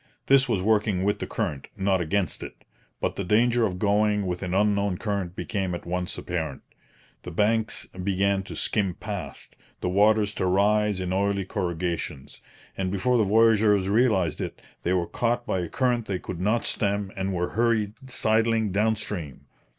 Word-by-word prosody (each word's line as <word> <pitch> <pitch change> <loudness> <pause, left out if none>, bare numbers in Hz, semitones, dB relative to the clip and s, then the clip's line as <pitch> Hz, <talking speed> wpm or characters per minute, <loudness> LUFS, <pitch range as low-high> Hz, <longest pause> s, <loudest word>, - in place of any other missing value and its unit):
This 135 -1 +4
was 100 -6 +1
working 105 -3 +2
with 105 +1 +1
the - - -4
current, 85 -11 -3
not 95 -1 +1
against 90 +1 -1
it; - - -9 0.4
but - - -2
the 100 - -1
danger 115 +4 +3
of 90 -2 -5
going 105 +1 +2
with 90 -1 -3
an 90 -2 -3
unknown 100 -1 +2
current 100 -4 -3
became 95 -5 -2
at - - -8
once 90 +1 -2
apparent. 80 -6 -4 0.6
The - - -7
banks 110 +5 0
began 95 +1 0
to - - -8
skim 100 -5 0
past, - - -7 0.2
the 90 - -1
waters 105 +2 +3
to 95 - +2
rise 105 +1 +2
in 90 0 -2
oily 100 0 0
corrugations; 85 -6 -3 0.3
and 95 -1 -2
before 110 +6 +1
the - - +4
voyageurs 105 -2 +4
realized 105 -6 +2
it, - - -5 0.2
they 90 - 0
were 90 -2 +1
caught 120 +5 -1
by 95 - -1
a 85 - -3
current 120 -3 0
they 95 - -1
could 90 -1 -6
not 110 +5 +1
stem 100 -1 0
and 95 0 -2
were 90 -1 -1
hurried 110 -2 +1 0.2
sidling 110 -2 +1
down 110 +3 +2
stream. 85 -10 -6
100 Hz, 175 wpm, -26 LUFS, 90-110 Hz, 0.6 s, This